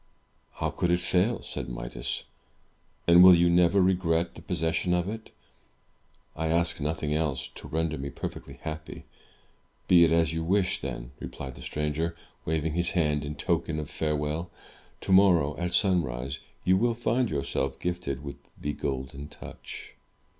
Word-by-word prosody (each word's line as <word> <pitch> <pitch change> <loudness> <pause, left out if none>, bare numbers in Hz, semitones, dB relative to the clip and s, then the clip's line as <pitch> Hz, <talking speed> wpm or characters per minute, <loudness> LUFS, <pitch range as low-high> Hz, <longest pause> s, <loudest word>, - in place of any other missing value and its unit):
"How - - -2
could 90 - -1
it 90 0 +3
fail?" 95 +6 +1
said - - -5
Midas. - - -4 0.8
"And 85 +1 +9
will 90 -1 +10
you 85 0 +4
never 90 +2 +4
regret 90 -3 +2
the - - -11
possession 85 0 0
of 90 +1 0
it?" 110 +2 -6 1.1
"I 80 +1 -1
ask 85 0 +1
nothing 75 0 -1
else, 75 -4 -1
to - - -11
render 80 -1 -1
me 70 +1 -4
perfectly - - -7
happy." 80 -1 -6 0.8
"Be 85 -2 +7
it 80 - +4
as 80 0 +3
you 80 0 -2
wish, 95 +2 +1
then," - - -5
replied 65 -1 -7
the - - -12
stranger, 75 +3 -2 0.3
waving 80 0 0
his 85 +1 +1
hand 75 -3 +2
in 75 0 -5
token 85 -3 -1
of 75 - -6
farewell. 75 +2 -1 0.5
"Tomorrow, 90 -7 +4
at 90 0 -1
sunrise, 70 - +1 0.2
you 95 +1 +4
will 115 +3 +2
find 120 +1 +1
yourself 70 -2 -2
gifted 85 -6 -3
with 70 -1 -6 0.2
the 75 - -2
Golden 70 +1 -4
Touch." - - -10
80 Hz, 155 wpm, -28 LUFS, 75-90 Hz, 1.1 s, will